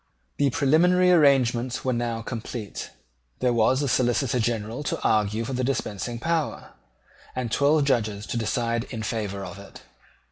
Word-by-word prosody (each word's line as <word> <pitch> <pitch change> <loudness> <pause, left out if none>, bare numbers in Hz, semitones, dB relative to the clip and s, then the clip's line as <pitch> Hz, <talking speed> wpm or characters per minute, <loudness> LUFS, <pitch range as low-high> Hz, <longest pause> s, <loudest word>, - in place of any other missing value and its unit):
The 140 - +3
preliminary 170 +6 +4
arrangements 130 -7 +3
were 130 - +1
now 120 -1 -2
complete. 115 -3 -6 0.5
There 125 -1 +1
was 125 +5 +3
a - - 0
Solicitor 125 0 +1
General 115 +1 -2
to - - -2
argue 110 +1 +1
for 135 - -4
the 130 0 -1
dispensing 120 -3 -2
power, 160 +4 -2 0.6
and 125 -3 -3
twelve 145 +3 +3
Judges 105 -6 0
to - - -5
decide 115 +1 -1
in 115 -3 -6
favour 100 -3 -3
of 100 - -9
it. 100 - -13
120 Hz, 150 wpm, -25 LUFS, 110-135 Hz, 0.6 s, preliminary